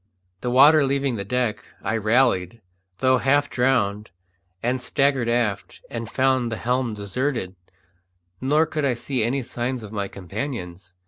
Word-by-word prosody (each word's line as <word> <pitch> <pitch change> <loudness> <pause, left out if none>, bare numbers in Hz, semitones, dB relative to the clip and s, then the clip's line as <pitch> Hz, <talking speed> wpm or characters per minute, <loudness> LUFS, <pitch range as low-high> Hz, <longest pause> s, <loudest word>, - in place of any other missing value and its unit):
The 125 - -2
water 145 +5 +7
leaving 135 -2 0
the 100 - -3
deck, 120 0 -1 0.2
I 110 - -1
rallied, 115 -3 +2 0.4
though 130 -1 +4
half 140 +2 +2
drowned, 110 -5 +1 0.5
and 125 +2 0
staggered 135 -2 +1
aft, 115 -5 -1
and 115 -2 -5
found 130 -2 +1
the 115 - -3
helm 125 -2 -1
deserted, 105 0 -2 0.9
nor 150 +5 +3
could 155 -1 -3
I 135 -3 +1
see 125 0 -2
any 130 +4 0
signs 120 +1 -3
of 105 - -9
my 100 -2 -2
companions. 95 -3 -6
125 Hz, 145 wpm, -23 LUFS, 105-135 Hz, 0.9 s, water